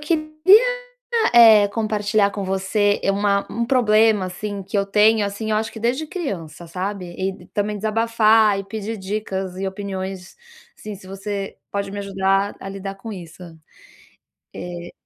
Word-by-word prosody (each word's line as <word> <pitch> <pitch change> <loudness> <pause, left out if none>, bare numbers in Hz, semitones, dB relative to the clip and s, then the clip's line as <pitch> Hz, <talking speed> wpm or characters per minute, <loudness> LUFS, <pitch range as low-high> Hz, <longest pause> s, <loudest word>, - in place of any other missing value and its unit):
queria, 310 0 -1 1.0
eh, 220 -3 +8
compartilhar 210 -1 +1
com 200 -1 -5
você 195 +2 +1
é 195 - +2
uma 200 0 +1
um 235 +1 -1
problema, 220 -5 +3
assim, 200 +2 -5
que 190 - -5
eu 200 - 0
tenho, 210 +2 +4
assim, 205 +2 -4
eu 215 - +2
acho 220 +1 -2
que 225 - -9
desde 250 +7 0
criança, 185 - -6
sabe. 185 +2 -4
E 190 +1 -1
e - - -18
também 210 0 -2
desabafar 220 -1 +3
e 195 - -4
pedir 220 +2 -5
dicas 190 -2 -4
e 195 - -2
opiniões 190 -2 -6 0.4
sim 210 -1 -8
se 185 - -15
você, 195 +1 -5
pode 200 -1 -3
me 205 - -5
ajudar 195 0 0
a - - -7
lidar 195 0 -6
com 215 +3 -8
isso. 175 -2 -10 1.1
Eh 175 -1 -7
205 Hz, 160 wpm, -21 LUFS, 195-215 Hz, 1.1 s, eh